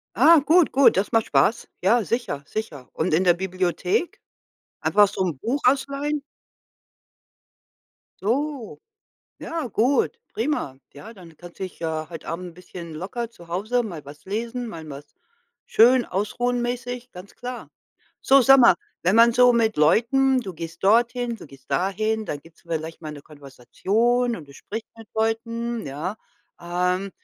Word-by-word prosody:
Ah, 310 +8 +7
gut, 335 +1 +4
gut, 275 0 +5
das 195 +2 0
macht 225 -1 +2
Spaß. 150 +12 +2
Ja, 225 +5 +3
sicher, 200 - -3
sicher, 150 - -6
und 160 -1 0
in 180 - +2
der 175 -2 +5
Bibliothek? 185 - -1 0.6
Einfach 205 0 +4
so 195 - -7
'n 170 -7 -2
Buch 245 - -2
ausleihen? 280 +3 +1 2.0
So. 265 +2 -2 0.6
Ja, 325 -4 -4
gut, 260 - +1
prima. 225 - -2 0.2
Ja, 215 +11 -11
dann 170 -6 -15
kannst 175 -1 -13
du - - -3
dich 185 - -8
ja 160 -1 -3
heute 165 -2 -9
Abend 180 +2 -4
’n - - -16
bisschen 170 -1 -10
locker 205 +9 -5
zu 175 -7 -16
Hause 215 +8 -1
mal 170 -9 -7
was 145 +1 -13
lesen, 235 +5 -4
mal 165 -7 -8
was 140 - -11 0.5
schön 245 +2 +5
ausruhen 240 +6 -1
mäßig, 245 +1 -4
ganz 180 +2 -11
klar. 245 0 -7 0.5
So, 275 0 +5
sag 270 +2 +7
mal, 235 -6 +7 0.3
wenn 185 +5 +3
man 235 +1 +7
so 245 +1 +6
mit 225 -2 +1
Leuten 250 - +3
du 195 -6 -7
gehst 165 +2 -8
dorthin, 235 +3 +2
du - - -12
gehst 135 -1 -18
dahin, 215 +8 0
dann 145 - -4
gibt's 165 +2 -20
vielleicht 160 -1 -5
mal 155 - -5
'ne 145 -1 -10
Konversation 205 - -1
und 155 - -11
du 140 - -14
sprichst 220 +7 -7
mit 225 -2 -13
Leuten, 230 +1 -1
ja, 155 +9 -4 0.4
ähm, 180 +2 -1
215 Hz, 160 wpm, -23 LUFS, 170-245 Hz, 2.0 s, Ah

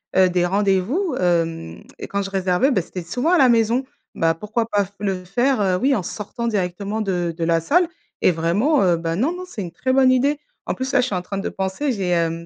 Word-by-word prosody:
heu, 185 -1 +5
des 180 0 +1
rendez-vous, 200 - +1
hem 165 - -1 0.2
et - - -6
quand 200 - -2
je 195 - -4
réservais 190 +5 +1
beh, 195 - +2
c'était 180 +2 -7
souvent 250 - -1
à 360 - +5
la 260 -3 +5
maison. 230 +2 +3 0.3
Bah, 165 0 +2
pourquoi 220 +5 -2
pas 205 -3 +1
f 195 - -18
le 190 -3 -2
faire, 240 +5 +1
heu, 185 -2 +2
oui, 270 +7 +2
en 200 - -2
sortant 225 +5 -5
directement 200 +1 -2
de 175 -4 -1
de 170 - -2
la 165 0 +2
salle? 340 - +2 0.3
Et - - +5
vraiment, 195 - +1
heu, 175 -3 +3
bah 165 0 -2
non 255 - +1
non, 360 +1 -6
c'est 220 - -6
une 175 - -6
très 260 +10 -1
bonne 260 -1 +5
idée. 280 +3 +2 0.3
En - - 0
plus 260 +1 -3
là, 270 - +5
je 250 - -1
suis 205 - -2
en 180 - -1
train 195 +1 -5
de - - -3
penser, 190 +10 -2
j'ai, 195 -6 -2
hem, 170 -1 0
195 Hz, 245 wpm, -21 LUFS, 180-255 Hz, 0.3 s, heu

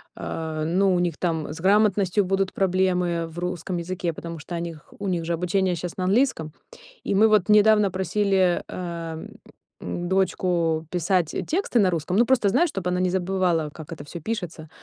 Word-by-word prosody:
а, 160 -1 -4
ну, 185 +4 +2
у 175 - +1
них 175 -3 -1
там 160 -4 -2
с 160 - -8
грамотностью 200 0 +3
будут 195 0 0
проблемы 180 -3 +1
в 165 +1 -13
русском 180 0 -3
языке, 175 0 -3
потому 165 0 -7
что 170 +3 -7
о - - -2
них 165 -3 -8
у 200 - -4
них 175 -3 -1
же 170 - -1
обучение 180 +2 0
щас 170 +1 -6
на 185 - -1
английском. 195 - +1 0.5
И - - -1
мы 220 +3 +5
вот 215 -3 +3
недавно 210 -1 +5
просили, 190 0 +1
эм, 170 -2 -6 0.5
дочку 175 -3 0
писать 180 -1 0
тексты 330 -7 0
на 185 -2 +4
русском, 170 +2 -2
ну, 235 - +5
просто 240 -4 +3
знаю, 335 - +3
чтобы 185 -8 -3
она 180 - 0
не 185 0 +1
забывала, 180 -4 0
как 155 0 -11
это 145 - -7
всё 170 +4 -8
пишется. 170 -6 -5
180 Hz, 180 wpm, -24 LUFS, 165-195 Hz, 0.5 s, мы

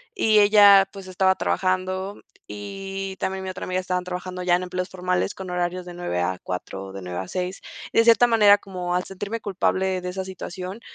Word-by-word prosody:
Y 220 - +4
ella, 205 -2 +7
pues, 195 -1 -10
estaba 190 0 +2
trabajando 185 +2 -1 0.2
y 195 -1 -6
también 190 0 -2
mi 190 - -4
otra 185 - -6
amiga 185 0 -1
estaban 180 -1 -2
trabajando 180 0 -5
ya 175 -1 +4
en 180 - -5
empleos 180 0 -4
formales 180 +1 -1
con 190 -1 -8
horarios 180 0 -2
de 175 - -8
9:00-4:00, 95 - -4
de 95 0 -8
9:00-6:00. 95 - -4 0.3
Y - - -1
de - - +7
cierta 235 +1 +6
manera, 210 -3 +6
como 180 -3 -5
al 180 0 0
sentirme 205 +4 -5
culpable 190 -2 0
de 180 - -4
esa 190 +1 -4
situación, 185 +2 -7
185 Hz, 180 wpm, -24 LUFS, 180-195 Hz, 0.3 s, ella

